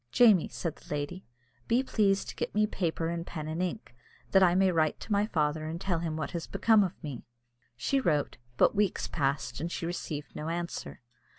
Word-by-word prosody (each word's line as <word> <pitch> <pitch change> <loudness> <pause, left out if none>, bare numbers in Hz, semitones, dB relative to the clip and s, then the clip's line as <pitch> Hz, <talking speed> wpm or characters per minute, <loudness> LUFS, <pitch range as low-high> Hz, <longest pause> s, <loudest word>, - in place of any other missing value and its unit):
"Jamie," 215 - +6
said 165 -3 -4
the - - -18
lady, 150 +5 -4 0.4
"be 240 +3 +3
pleased 200 -6 +2
to - - -7
get - - -3
me 215 0 +4
paper 165 -5 -1
and 170 0 -4
pen 155 -2 -5
and 160 +3 -2
ink, 185 - -3 0.4
that 190 - +6
I 180 -2 +5
may 190 0 +4
write 160 -3 +1
to - - -8
my 205 +1 +3
father, 155 -4 0
and 165 +2 -4
tell 180 -3 0
him 160 -2 -3
what 155 - -3
has 170 -2 -4
become 220 -2 +4
of 185 - -5
me." 140 -6 -5 0.6
She 270 - +1
wrote, 150 - 0 0.2
but - - +5
weeks 205 -3 +1
passed, 140 -1 -1
and 170 +2 -3
she 165 - -3
received 155 -4 -5
no 155 +2 -4
answer. 170 -3 -4
170 Hz, 205 wpm, -30 LUFS, 155-195 Hz, 0.6 s, Jamie